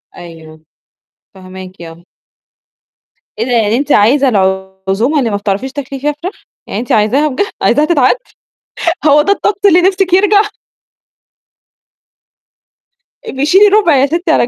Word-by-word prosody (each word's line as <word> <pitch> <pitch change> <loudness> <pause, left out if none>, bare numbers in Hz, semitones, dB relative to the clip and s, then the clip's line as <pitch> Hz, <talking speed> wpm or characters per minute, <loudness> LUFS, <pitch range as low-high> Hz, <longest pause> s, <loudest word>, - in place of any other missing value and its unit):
أيوه، 160 -2 -13 0.7
فاهماكِ 185 -1 -11
آه. 165 0 -12 1.4
إيه 230 - -1
ده 250 - -4
يعني 225 -2 +1
أنتِ 285 +2 -3
عايزة 265 +6 +3
العزومة 190 +5 -1
اللي 240 - -1
ما 205 - -2
بتعرفيش 205 +6 -3
تاكلي 275 -1 -7
فيها 295 +3 -1
فراخ؟ 370 +4 -7 0.2
يعني 205 - -4
أنتِ 240 - -6
عايزاها 230 +8 +2
بجد؟ 300 +8 -2 0.2
عايزاها 300 - +2
تتعاد؟ 340 - +2 0.9
هو 295 0 +5
ده 400 - +1
الطقس 405 0 -1
اللي 360 -2 +5
نفسِك 380 0 0
يرجع؟ 405 +2 +4 2.8
أبقي 275 - -3
شيلي 385 +7 +5
1/4 400 -6 +3
يا 270 0 +3
ستي 335 +3 -2
على - - +2
جنب، - - -9
265 Hz, 140 wpm, -12 LUFS, -, 2.8 s, هو